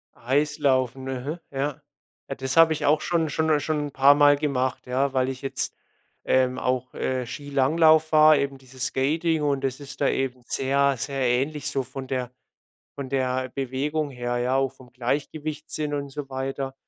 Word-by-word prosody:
EIslaufen, 135 -1 0
aha, 135 +6 -4
ja. 140 0 -3 0.5
Ja, - - -3
das 130 0 -3
habe 165 -1 +7
ich 150 -1 -3
auch 155 +1 +3
schon 165 -2 0
schon 160 +2 0
'n 150 -1 +4
schon 150 0 -1
'n - - -10
paarmal 145 +2 +6
gemacht, 130 -3 -1
ja. 135 +2 0
Weil 130 -1 +1
ich 130 -1 -6
jetzt 135 - -3 0.5
ähm, 130 0 +2
auch, 125 0 -1
äh, 130 -1 -2
Skilanglauf 155 +4 +2
war, 155 -1 +7
eben 140 0 -2
diese 130 0 -16
Skating. 155 +6 0
Und 140 -2 0
das 130 0 -2
ist 140 -1 -10
da 140 - +3
eben 130 -2 -1
sehr, 140 +1 +2
sehr 135 +2 -3
ähnlich 140 +5 0
so 135 -3 -1
von 130 +1 -8
der 125 -2 -3 0.7
von 140 -2 -5
der 130 -1 -1
Bewegung 140 +3 -2
her, 120 -1 -3
ja, 125 +2 +1
auch 135 -1 +1
vom 130 -2 -17
Gleichgewichtssinn 150 +4 -3
und 140 -1 -3
so 140 0 -6
weiter. 135 0 -4
135 Hz, 175 wpm, -25 LUFS, 130-150 Hz, 0.7 s, habe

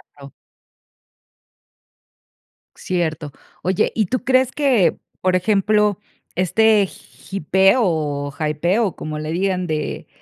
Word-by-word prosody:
Claro. 140 -2 -13 2.4
Cierto. 160 -4 -3 0.3
Oye, 185 +1 +1
¿y 215 -4 +1
tú 255 +7 -2
crees 260 0 +3
que, 250 - +2 0.2
por 185 0 +2
ejemplo, 210 +1 +2 0.4
este 210 +3 +3
hypeo 195 - 0
o 145 -6 -1
hypeo, 170 +8 +1
o 185 - -6
como 155 0 -5
le 155 +1 -4
digan, 185 +1 -1
de 155 -2 -3
185 Hz, 105 wpm, -20 LUFS, 155-210 Hz, 2.4 s, crees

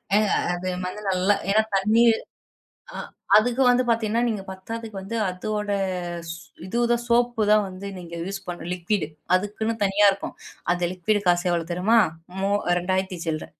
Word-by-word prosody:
ஏங்க 210 -1 +3 0.2
அது 175 +1 -5 0.2
வந்து 210 +3 -6
நல்லா 190 +2 +3
ஏன்னா 215 +2 +5
தண்ணி 215 +4 +3 0.9
ஆ - - -6 0.4
அதுக்கு 245 +4 +3
வந்து 245 +1 +4
பார்த்தீங்கன்னா, 230 0 +1
நீங்க 210 -4 -2
பத்தாத்துக்கு 220 +3 -7
வந்து 195 +4 -5
அதோட 210 +3 -3 0.6
ஸ் - - -2 0.3
இதுதான் 235 +3 +1
சோப்பு 240 -1 +2
தான் 210 -1 +5
வந்து 185 +2 -8
நீங்க 170 -1 -9
யூஸ் 195 +1 -5
பண்ணணும், 175 -1 -5
லிக்விடு. 180 -1 -1 0.3
அதுக்குன்னு 210 +4 0
தனியா 200 +1 +5
இருக்கும். 195 - -6 0.4
அது 175 0 0
லிக்விட் 205 +3 0
காசு 175 +1 +3
எவ்வளோ 170 -2 0
தெரியுமா? 200 +7 +3 0.4
மூ 195 - +1 0.3
2,000த்தி 185 0 -1
சில்ற. 155 -1 -2
200 Hz, 150 wpm, -24 LUFS, 185-220 Hz, 0.9 s, ஏன்னா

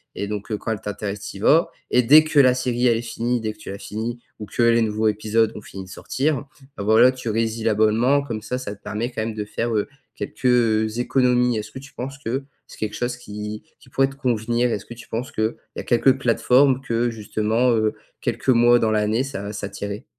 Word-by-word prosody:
et 100 - -3
donc 105 +1 -5
heu, 105 - 0
quand 110 - -4
elle 110 - -2
t'intéresse, 105 0 -4
tu - - -8
y - - -10
vas 155 +10 +4 0.2
et 125 - +5
dès 150 +6 +8
que 155 -1 +2
la 130 -2 +6
série 125 -1 0
elle 115 -2 +3
est - - -3
finie, 120 +1 -1
dès 110 -1 -2
que - - -24
tu - - -9
l'as 100 - -6
finie 115 +4 -5 0.2
ou 105 - -5
que - - -2
les 115 0 +4
nouveaux 110 0 +1
épisodes 110 +1 +1
ont - - -7
fini 95 -1 -9
de 95 - -14
sortir, 135 +8 -2 0.3
bah - - -4
voilà, 110 +4 +6
tu 125 -3 -6
résilles 115 +1 -1
l'abonnement, 115 +5 +3
comme 115 -6 -5
ça, 115 +4 -3
ça 125 -5 -5
te - - -27
permet 115 +4 -3
quand 120 - -3
même 110 0 -3
de 105 - -3
faire, 115 +3 -3
heu, 105 - 0 0.3
quelques, - - -7
heu, 115 -3 +3
économies. 125 -1 +2
Est-ce 105 0 -5
que 130 - -8
tu 140 +1 -14
penses 135 +2 -6
que 130 +4 -2 0.2
c'est - - -14
quelque 110 -1 -3
chose 125 0 -2
qui 105 -2 -7 0.2
qui 130 - -19
pourrait 135 +1 +2
te 135 - -12
convenir? 120 -2 0
Est-ce 105 - -3
que - - -9
tu 120 - -13
penses 120 +3 -4
qu'il 110 +1 -1 0.2
y - - -5
a - - -4
quelques 130 +2 +3
plateformes 130 +2 +3
que 120 -1 0
justement, 110 +2 0
heu, 110 -2 +2 0.3
quelques - - -2
mois 120 -1 +6
dans 110 -1 +1
l'année, 110 +3 +1
ça 105 -7 -5
ça 100 0 -4
t'irait? 100 +4 -6
115 Hz, 240 wpm, -22 LUFS, 110-125 Hz, 0.3 s, dès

